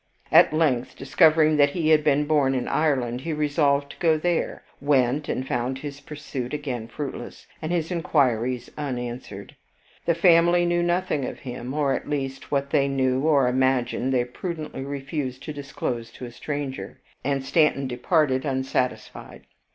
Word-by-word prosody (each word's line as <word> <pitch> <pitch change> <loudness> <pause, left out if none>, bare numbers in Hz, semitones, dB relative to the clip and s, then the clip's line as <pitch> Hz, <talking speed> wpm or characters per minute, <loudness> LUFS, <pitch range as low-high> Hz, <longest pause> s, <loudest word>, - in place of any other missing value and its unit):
At - - +7
length, 145 -6 +1
discovering 155 +2 +4
that 145 -1 +5
he 155 +1 -1
had 155 -1 +5
been 145 0 +3
born 145 -3 +2
in 125 - -2
Ireland, 130 -6 0
he 160 +3 -3
resolved 145 -1 +1
to - - -14
go 160 -2 +3
there, 175 +2 -1 0.2
went, 140 0 +2
and 130 - -2
found 125 -1 -1
his 140 0 -7
pursuit 145 -3 -5
again 130 -6 -4
fruitless, 140 +3 -7 0.2
and 155 +1 -3
his 170 -1 -1
inquiries 130 -8 0
unanswered. 120 -7 -5 0.5
The 170 - +3
family 175 0 +5
knew 175 0 +1
nothing 175 -4 0
of - - -7
him, 125 -1 -6
or 145 -3 +1
at - - -4
least 135 -2 -3
what 140 -1 -1
they 140 -3 +3
knew 130 -1 +1
or 140 -5 +4
imagined, 130 0 +1
they 125 -2 +2
prudently 155 +2 -6
refused 135 -1 -4
to 155 - -5
disclose 125 -5 -4
to 125 - -8
a 120 - -8
stranger, 140 +1 -5 0.2
and 135 -1 -1
Stanton 150 -2 +2
departed 130 +1 +1
unsatisfied. 130 -2 -3
140 Hz, 160 wpm, -24 LUFS, 130-155 Hz, 0.5 s, At